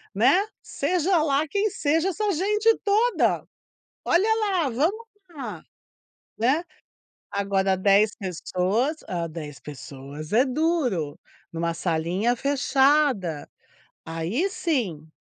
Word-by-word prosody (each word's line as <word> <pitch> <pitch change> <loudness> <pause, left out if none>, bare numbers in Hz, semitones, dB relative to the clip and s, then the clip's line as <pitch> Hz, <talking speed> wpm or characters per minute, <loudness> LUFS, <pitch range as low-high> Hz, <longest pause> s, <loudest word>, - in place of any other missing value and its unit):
Né. 275 - +4 0.2
Seja 360 -1 +1
lá 300 0 +1
quem 405 +5 0
seja 325 +3 +1
essa 415 +2 -1
gente 420 +6 +2
toda! 445 +4 +2 0.6
Olha 380 +6 +3
lá, 375 - +1
vamos 360 - 0 0.2
lá, 235 - -7 0.8
né. 265 +9 +2 0.7
Agora 195 -1 +1
10 200 +3 +4
pessoas, 195 - -1
ah, 170 -2 -2
10 150 -3 -8
pessoas 145 +2 -9
é 245 +5 +5
duro, 255 - 0 0.3
numa 165 0 -1
salinha 175 +8 0
fechada. 275 - +2 0.6
Aí 175 - -1
sim, 215 - -2
255 Hz, 105 wpm, -25 LUFS, -, 0.8 s, é